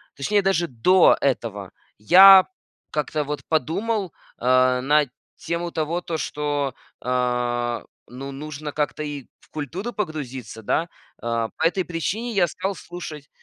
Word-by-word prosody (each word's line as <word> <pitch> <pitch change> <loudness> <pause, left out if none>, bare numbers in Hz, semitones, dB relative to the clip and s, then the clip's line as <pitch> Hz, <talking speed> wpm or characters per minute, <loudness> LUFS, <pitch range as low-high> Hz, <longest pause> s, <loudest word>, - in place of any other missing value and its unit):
точнее 200 +10 +1
даже 190 -3 +1
до 175 +10 +5
этого, 110 -8 -2 0.3
я 190 - +9 0.4
как-то 150 0 -2
вот 150 +1 -4
подумал, 190 +4 -1 0.3
э, 130 +1 +3
на 145 +2 +3 0.3
тему 170 0 -4
того, 160 +2 -1
то, 170 -2 -4
что, 145 -3 -2 0.3
а, 125 -1 -1 0.2
ну, 135 +3 -8
нужно 150 +1 -6
как-то 150 +1 -2
и 145 -3 -6
в - - -25
культуру 165 - -5
погрузиться, 135 - -5
да. 160 +10 0 0.3
А, 115 -1 -1
по - - -2
этой 185 +2 -1
причине 200 +8 -3
я 185 -4 +3
стал 195 +5 -3
слушать 155 -6 -9
150 Hz, 135 wpm, -23 LUFS, 130-175 Hz, 0.4 s, я